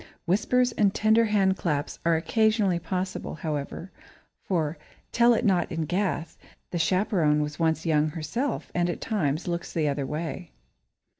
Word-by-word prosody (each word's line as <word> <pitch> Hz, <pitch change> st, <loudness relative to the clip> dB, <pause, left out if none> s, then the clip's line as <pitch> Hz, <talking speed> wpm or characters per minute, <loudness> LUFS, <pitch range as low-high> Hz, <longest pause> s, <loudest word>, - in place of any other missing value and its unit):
Whispers 245 Hz, +7 st, +2 dB
and 205 Hz, -3 st, +2 dB
tender 220 Hz, +2 st, +4 dB
hand 195 Hz, -3 st, +2 dB
clasps 150 Hz, -4 st, -2 dB
are 170 Hz, -1 st, +4 dB
occasionally 215 Hz, +1 st, +2 dB
possible, 185 Hz, -1 st, -4 dB
however, 155 Hz, +3 st, -4 dB, 0.5 s
for, 160 Hz, -4 st, -1 dB, 0.3 s
tell 235 Hz, 0 st, +5 dB
it 230 Hz, -, -1 dB
not 185 Hz, -4 st, +2 dB
in 165 Hz, -2 st, -2 dB
Gath! 175 Hz, -1 st, -2 dB, 0.3 s
the 175 Hz, -, -2 dB
chaperone 175 Hz, -4 st, +2 dB
was 150 Hz, +1 st, -6 dB
once 160 Hz, 0 st, +1 dB
young 155 Hz, -2 st, +3 dB
herself 200 Hz, -, -3 dB
and 175 Hz, 0 st, +1 dB
at 175 Hz, -, -3 dB
times 165 Hz, -7 st, -1 dB
looks 170 Hz, 0 st, -3 dB
the 155 Hz, -2 st, 0 dB
other 140 Hz, -1 st, -1 dB
way. 165 Hz, +2 st, -4 dB
175 Hz, 150 wpm, -26 LUFS, 155-205 Hz, 0.5 s, tell